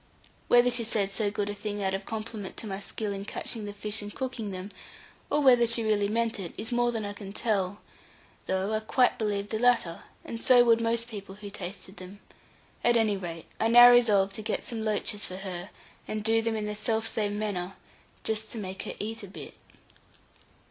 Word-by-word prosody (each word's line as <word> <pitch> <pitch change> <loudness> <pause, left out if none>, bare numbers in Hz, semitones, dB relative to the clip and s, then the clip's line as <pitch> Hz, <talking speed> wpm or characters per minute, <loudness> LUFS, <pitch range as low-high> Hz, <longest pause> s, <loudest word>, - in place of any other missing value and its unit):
Whether 245 0 +5
she 240 -1 +4
said 210 -3 +1
so 205 0 +1
good 205 0 -2
a 205 - -2
thing 205 0 -4
out 190 0 +1
of 195 0 -4
compliment 215 -3 -5
to - - -5
my 195 -2 -4
skill 205 0 -3
in 195 0 -5
catching 215 +1 -4
the 205 - -5
fish 210 +1 -2
and 205 0 -7
cooking 250 -3 -4
them, 190 +1 -6 0.6
or 295 - +2
whether 245 -4 +6
she 230 0 +2
really 210 -2 +2
meant 225 0 0
it, 175 -4 -6
is 225 +3 -4
more 240 0 +2
than 225 -3 -3
I 205 - -4
can 200 -1 -8
tell, 205 -3 -1 0.7
though 190 +3 0
I 215 - +2
quite 245 +3 +2
believe 205 -2 -1
the 220 - -2
latter, 235 -9 +2 0.2
and 230 - -6
so 245 -1 +7
would 230 -1 +4
most 230 0 0
people 200 -4 -8
who 205 0 -9
tasted 190 0 -7
them; 185 +2 -10 0.6
at 240 0 +4
any 220 -3 +3
rate, 170 -4 -6
I 225 - +2
now 240 +1 +10
resolved 205 -5 +4
to - - -5
get 215 0 -2
some 225 -2 -4
loaches 210 -1 -1
for 185 - -6
her, 185 -3 -6 0.4
and 215 -1 -3
do 225 +1 +3
them 225 0 -1
in 215 -1 -2
the 210 0 -3
self 220 +1 0
same 210 -2 -1
manner, 195 -3 -3 0.5
just 220 0 -1
to - - -6
make 190 -2 -5
her - - -5
eat 225 +2 -4
a 200 - -8
bit. 190 - -9
215 Hz, 210 wpm, -28 LUFS, 200-230 Hz, 0.7 s, now